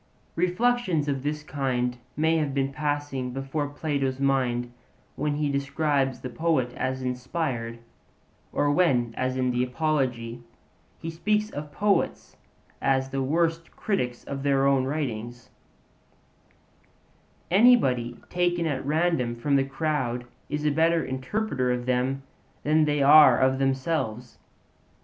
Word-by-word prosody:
Reflections 180 -2 +1
of 135 -2 -1
this 150 +2 -3
kind 130 -6 -2 0.2
may 160 +1 +3
have 145 -3 -1
been 135 0 0
passing 145 -3 -2
before 135 +3 -2
Plato's 140 -3 -2
mind 125 -3 0 0.4
when 145 0 -1
he 150 0 0
describes 140 -1 0
the 125 - -5
poet 145 -5 0
as 130 +1 -3
inspired, 125 -2 -3 0.7
or 145 - +1
when, 130 -8 +2
as 130 0 -1
in 125 -1 +1
the 125 0 +1
Apology, 125 -4 -1 0.6
he 165 - -6
speaks 210 +6 0
of 145 0 -6
poets 205 +5 0 0.5
as 135 0 +1
the 135 0 -1
worst 165 +4 0
critics 125 - -2
of 140 -1 -5
their 135 -1 +2
own 135 -2 +3
writings 120 -4 -4 2.0
anybody 135 - +4
taken 175 -1 0
at 145 -5 -1
random 150 -5 +1
from 140 +4 0
the 135 - +4
crowd 135 -3 -2 0.2
is 150 +1 -2
a 150 - +3
better 165 +2 +2
interpreter 130 - -1
of 125 0 -2
them 130 +2 0 0.4
than 155 +1 +3
they 145 -1 +1
are 145 -3 +8
of 130 0 +2
themselves. 130 -3 -1
140 Hz, 130 wpm, -26 LUFS, 125-155 Hz, 2.0 s, are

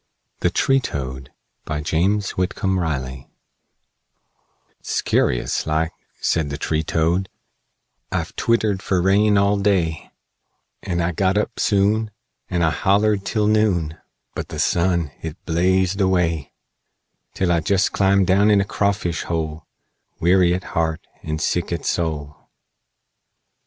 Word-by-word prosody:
THE - - +2
TREE 135 0 +2
TOAD 65 - -5 0.4
BY 75 -1 -3
JAMES 95 +6 +1
WHITCOMB 95 +1 -1
RILEY 65 -6 -3 1.5
"'Scurious - - 0
like," 80 +1 0 0.3
said 80 -3 0
the 70 - -4
tree 80 +1 -1
toad, 85 +4 0 0.8
"I've - - -3
twittered 110 -4 +1
fer 95 -2 0
rain 100 +3 +3
all 100 +1 +3
day; 90 -6 0 0.7
And 85 -2 -2
I 85 - 0
got 95 +3 +1
up 105 - -1
soon, 105 +2 +2 0.4
And 90 -2 0
I 80 - +3
hollered 100 +2 +2
till 105 -2 +1
noon 100 -8 +2 0.4
But - - -5
the - - -7
sun, 85 -3 +1
hit 80 +1 -6
blazed 95 +3 +1
away, 90 -6 +1 0.8
Till 95 -2 +1
I 85 - +3
jest 95 +4 +1
clumb 100 0 +3
down 100 +3 +4
in 105 -1 +5
a 100 - +1
crawfish 100 -4 -1
hole, 80 -1 -3 0.5
Weary 90 0 +4
at 90 - -4
heart, 80 -1 -1 0.2
and 80 0 -4
sick 90 +2 -1
at 85 - -3
soul! 75 -4 -3
90 Hz, 130 wpm, -21 LUFS, 80-100 Hz, 1.5 s, in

